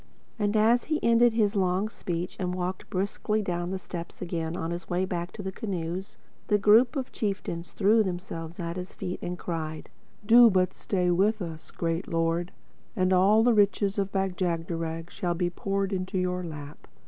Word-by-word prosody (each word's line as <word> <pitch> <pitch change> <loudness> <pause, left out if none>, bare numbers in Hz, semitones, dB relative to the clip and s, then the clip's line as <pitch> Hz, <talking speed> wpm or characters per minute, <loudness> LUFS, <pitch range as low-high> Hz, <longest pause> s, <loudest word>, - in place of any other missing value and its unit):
And 210 +1 +1
as 230 +3 +4
he 310 0 0
ended 235 0 +5
his 215 -2 +2
long 190 +1 +1
speech 175 -5 -4
and 180 -1 -1
walked 185 +1 -4
briskly 205 +3 -1
down 175 -2 -2
the 190 - -2
steps 175 -2 -7
again 170 -2 -3
on 165 +1 -3
his 170 +1 -6
way 180 +1 +1
back 175 -1 -3
to 205 - -7
the 190 - -3
canoes, 185 -3 -4 0.3
the 210 - +4
group 220 +6 +5
of 265 -2 -3
chieftains 195 -5 -3
threw 215 +3 +4
themselves 175 -4 -4
at 170 0 -3
his 180 +1 -6
feet 185 -1 -5
and 180 0 -4
cried, 160 -3 -5 0.3
"Do 235 +2 +8
but 185 -2 +2
stay 180 -3 0
with 205 +5 +2
us, 165 -4 -7
Great 165 +1 -2
Lord, 165 +1 0 0.4
and 185 0 +2
all 200 +4 +5
the 240 0 +5
riches 205 -1 +2
of 195 0 -1
Bag 190 -2 -1
jagderag 165 -1 -2
shall 175 -1 -2
be 175 0 0
poured 195 +2 -2
into 185 +1 -2
your 180 0 -1
lap. 150 -3 -8
185 Hz, 185 wpm, -27 LUFS, 170-205 Hz, 0.4 s, Do